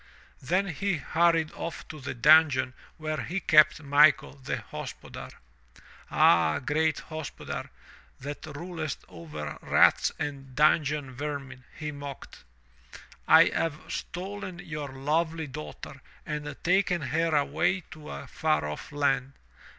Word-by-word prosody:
Then 185 +8 +1
he 195 +3 -1
hurried 165 +1 +2
off 170 - -6
to 155 - -8
the 135 - -5
dungeon 135 -1 +5 0.2
where 155 0 -3
he 185 +3 -3
kept 155 -2 +5
Michael, 145 0 +5
the 135 -2 -4
hospodar. - - -8 0.8
"Aha, 80 -2 +4
great 155 +4 +1
hospodar, 155 -3 -6 0.5
that 145 +2 -6
rulest 155 0 -5
over 75 -4 -7
rats - - +4
and 135 -3 -5
dungeon 150 -2 +2
vermin," 135 -2 -6
he 150 -1 -4
mocked, 140 -1 -9 0.8
"I - - +7
have 155 -2 -1
stolen 185 0 -5
your 150 -5 -6
lovely 160 +4 -1
daughter 140 -1 -9 0.2
and 150 -1 -4
taken 180 -1 +2
her 160 +4 +1
away 155 +6 +1
to 155 -1 -10
a 70 0 -7
far 75 0 0
off 75 - -6
land. 135 -2 0
150 Hz, 120 wpm, -28 LUFS, 135-160 Hz, 0.8 s, I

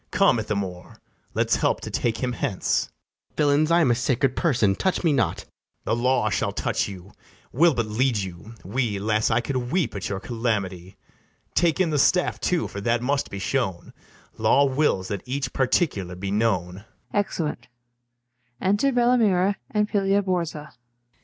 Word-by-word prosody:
Come, 195 - +3
Ithamore, 100 -5 -4 0.4
let's - - +2
help - - +1
to - - -6
take 120 +1 -1
him 125 - 0
hence. 100 -4 0
FRIAR - - -20
JACOMO. - - -41 0.2
Villains, 150 +2 +3
I 170 +1 +5
am 135 -7 +3
a - - +5
sacred 130 +2 0
person; 120 - +2
touch 185 - -1
me 165 -3 +3
not. 110 - 0
BARABAS. - - -42
The - - +1
law 120 -2 +1
shall - - 0
touch - - -1
you; 95 0 -10 0.4
we'll 165 +3 +4
but 115 -2 0
lead 115 +3 +1
you, 95 +3 -6
we: 110 0 -1
'Las, 110 +2 +1
I - - +2
could 125 0 -3
weep 165 - 0
at 95 -1 -4
your 100 -1 -3
calamity! 100 -5 -3 0.6
Take 170 +1 +2
in 175 -4 +2
the 150 - +1
staff 180 +6 +2
too, 180 -2 0
for 100 - -7
that 120 +2 0
must 140 +2 0
be 100 - -6
shown: 95 -4 -2 0.5
Law 115 +6 +4
wills 130 -9 +1
that 100 -2 -3
each 135 -1 -3
particular 120 - 0
be 95 +2 -4
known. 100 -3 0
115 Hz, 155 wpm, -24 LUFS, 100-135 Hz, 0.6 s, I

